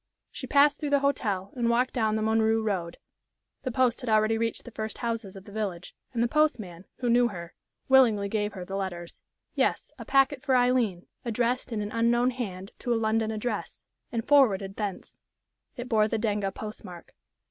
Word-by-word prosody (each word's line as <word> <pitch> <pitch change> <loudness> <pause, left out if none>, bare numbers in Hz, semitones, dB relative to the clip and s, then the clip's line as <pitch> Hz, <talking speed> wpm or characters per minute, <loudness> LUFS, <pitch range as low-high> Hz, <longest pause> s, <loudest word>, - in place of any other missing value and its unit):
She - - -7
passed 285 +1 +4
through 295 - -2
the 285 -1 +3
hotel 205 -9 -1
and 235 -2 0
walked 245 +2 +2
down 220 -3 +1
the 220 - -1
Montreux 220 0 +2
road. 180 -5 -2 0.6
The 260 - -3
post 250 -1 +2
had 250 - -4
already 215 0 +3
reached 230 0 -2
the 240 - -9
first 220 0 -5
houses 230 -5 -3
of 195 0 -11
the - - -12
village, 200 -5 -4 0.2
and 235 -2 0
the - - +2
postman, 220 - 0
who 245 - -3
knew 240 +1 +5
her, 170 -6 -8 0.3
willingly 235 -7 +5
gave 210 0 -1
her 180 -2 -7
the 195 - -5
letters. 175 -3 -5 0.3
Yes, - - 0
a 230 - -7
packet 270 +1 +3
for 270 -1 +1
Aileen, 245 -8 +2 0.2
addressed 245 +1 -1
in 215 -2 -2
an 205 - -5
unknown 240 +2 +2
hand 195 -6 -6
to 245 - -3
a - - +3
London 220 0 +1
address, 220 0 -4 0.3
and 230 -2 -3
forwarded 205 -9 +4
thence. 205 -3 -5 0.6
It 245 0 -5
bore 215 -3 +3
the 225 - -1
Denga 205 -3 -1
postmark. 195 -4 -9
220 Hz, 190 wpm, -27 LUFS, 200-245 Hz, 0.6 s, knew